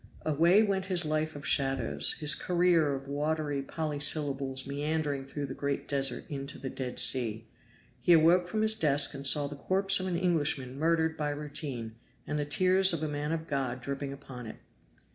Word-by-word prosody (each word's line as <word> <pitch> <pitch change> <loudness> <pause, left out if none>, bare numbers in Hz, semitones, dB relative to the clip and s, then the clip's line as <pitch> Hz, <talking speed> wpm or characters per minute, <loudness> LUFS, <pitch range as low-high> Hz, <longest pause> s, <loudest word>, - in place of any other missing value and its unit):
Away 170 +7 +4
went 195 -2 -1
his 180 -3 +2
life 155 0 -2
of 145 - -9
shadows 135 -1 +1
his 150 -2 +3
career 170 -5 +2
of 135 0 -8
watery 145 0 -2
polysyllables 145 -3 0
meandering 145 -1 -2
through 145 +1 -5
the 135 - -6
great 140 0 -3
desert 135 -1 0
into 140 -1 -6
the 135 - -6
Dead 125 -2 -6
Sea. 115 -4 +2 0.5
He 125 +8 +4
awoke 170 +2 +4
from 215 +4 -1
his 220 0 +5
desk 145 -8 +3
and 140 -1 -1
saw 145 +1 +4
the 145 +1 -6
corpse 195 +6 +1
of 185 - -3
an 175 -2 -1
Englishman 145 -7 -1
murdered 160 0 +1
by 150 -1 -2
routine, 145 -6 -4 0.3
and 150 +1 -3
the 145 - -1
tears 185 +5 +3
of 160 -2 -3
a - - -1
man 150 +1 -3
of 160 -1 -3
God 135 -5 -3
dripping 140 +2 -5
upon 130 -4 -9
it. - - -8
145 Hz, 180 wpm, -29 LUFS, 140-165 Hz, 0.5 s, his